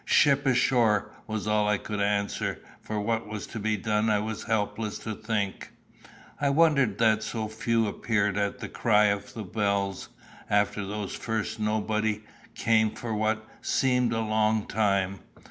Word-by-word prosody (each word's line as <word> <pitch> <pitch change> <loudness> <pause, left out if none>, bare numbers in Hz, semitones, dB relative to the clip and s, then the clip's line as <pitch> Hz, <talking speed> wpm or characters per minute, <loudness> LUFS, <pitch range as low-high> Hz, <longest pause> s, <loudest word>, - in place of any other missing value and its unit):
"Ship 140 -1 +4
ashore!" 115 -5 +3 0.2
was 110 -1 -3
all 105 -1 +2
I 105 - +3
could 105 0 -4
answer, 100 0 0 0.2
for 110 -1 -3
what 115 +2 -1
was 105 -1 -5
to 115 - -7
be 110 +1 0
done 105 +2 +1
I 105 - +3
was 110 +1 -4
helpless 105 -1 -1
to 110 - -5
think. 105 -2 -3 0.7
I 145 - +2
wondered 140 -8 +3
that 110 -1 +3
so 110 0 -3
few 115 +1 0
appeared 105 -1 0
at 100 -1 -1
the - - -6
cry 105 -3 +3
of 100 0 -8
the 110 - -4
bells. 100 -1 -1 0.4
After 105 0 +1
those 100 0 -4
first 110 0 -3
nobody 110 0 0 0.3
came 110 -2 +2
for 115 -2 -4
what 110 +1 0
seemed 125 -2 +2
a 115 - 0
long 110 -1 +1
time. 100 -2 0
110 Hz, 160 wpm, -27 LUFS, 105-115 Hz, 0.7 s, Ship